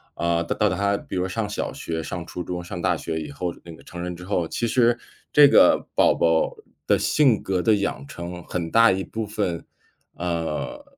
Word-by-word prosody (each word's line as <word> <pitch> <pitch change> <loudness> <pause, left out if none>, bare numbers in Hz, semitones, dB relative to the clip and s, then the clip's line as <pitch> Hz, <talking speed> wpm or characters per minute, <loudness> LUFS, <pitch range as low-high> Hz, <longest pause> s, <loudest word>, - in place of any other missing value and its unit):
呃 85 0 0
到 105 +5 +1
他 100 +2 0
比 - - -8
如 90 0 0
上 110 +2 -2
小 105 - -3
学， 80 -1 -4
上 85 +1 -5
初 90 +1 -6
中， 90 +1 -5
上 85 0 -6
大 90 -3 +1
学 80 0 -4
以 75 -2 -7
后 85 +4 -3
那 85 - -10
个 - - -17
成 85 - -8
人 90 0 -4
之 90 - -11
后， 90 -4 -1
其 120 - -2
实 120 0 +3 0.3
这 145 -1 +8
个 - - +5
宝 - - +5
宝 80 -1 +1 0.3
的 - - +4
性 130 -9 +3
格 95 -2 -1
的 110 +3 +4
养 100 -9 -2
成 85 +2 -7
很 85 -1 -4
大 115 0 +6
一 95 0 -1
部 110 +2 -4
分， 100 -5 -2 0.5
呃， 85 - -3
90 Hz, 220 characters per minute, -24 LUFS, 85-105 Hz, 0.5 s, 这